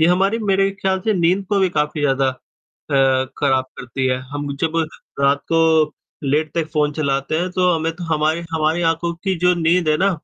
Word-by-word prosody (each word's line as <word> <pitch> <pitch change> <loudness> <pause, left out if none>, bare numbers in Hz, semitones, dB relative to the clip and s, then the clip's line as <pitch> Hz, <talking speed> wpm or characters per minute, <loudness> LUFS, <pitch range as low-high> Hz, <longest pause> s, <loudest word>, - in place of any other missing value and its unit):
ये 160 - +5
हमारी 195 +5 +2
मेरे 195 -2 +1
ख्याल 190 0 0
से 220 - +2
नींद 180 +3 +2
को 205 -1 +1
भी 190 - +3
काफ़ी 150 -1 -1
ज़्यादा 135 -2 +2
अ, 130 - -1
खराब 135 -3 +2
करती 130 +2 -3
है। 130 0 +1
हम 145 -1 -4
जब 165 0 0 0.4
रात 140 +1 +3
को 160 -2 +3 0.3
लेट 150 +3 0
तक 160 - 0
फ़ोन 150 -1 +1
चलाते 140 +1 -1
हैं 180 +1 -1
तो 180 0 +2
हमें 165 0 -1
तो 175 - -6
हमारी 155 +2 +1
हमारी 160 +2 +1
आँखों 165 +1 0
की 190 -1 +1
जो 180 +1 +3
नींद 170 0 +1
है 155 - +3
ना 195 +4 +2
160 Hz, 200 wpm, -20 LUFS, 140-180 Hz, 0.4 s, ये